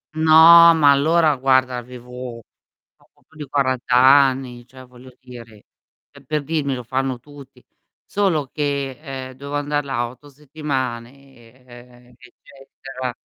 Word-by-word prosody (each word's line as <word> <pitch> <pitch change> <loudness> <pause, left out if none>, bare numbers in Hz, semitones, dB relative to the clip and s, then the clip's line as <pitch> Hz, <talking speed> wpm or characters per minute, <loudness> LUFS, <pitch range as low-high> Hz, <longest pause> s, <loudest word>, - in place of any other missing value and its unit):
No, 165 +1 +7
ma 145 -3 +4
allora 155 +2 +2
guarda, 130 -1 +1
avevo 125 0 -10 0.6
poco - - -32
più 160 - -26
di 150 - -7
40 130 -2 -1
anni, 130 -1 +3
cioè 130 0 -15
voglio 125 +1 -17
dire, 120 -4 -14 0.5
pe 140 -1 -18
per 150 +2 -3
dirmi: 145 -3 -3
"Lo 125 - -8
fanno 130 +1 -3
tutti." 135 -1 -17 0.4
Solo 180 -8 -1
che, 140 -3 -4
ehm, 130 -1 -8
dovevo 140 +2 -6
andar 145 0 -2
là 120 -3 -3
8 130 +4 -16
settimane, 130 -3 -8
ehm, 120 0 -17
eccetera, 130 0 -10
135 Hz, 130 wpm, -19 LUFS, 125-145 Hz, 0.6 s, No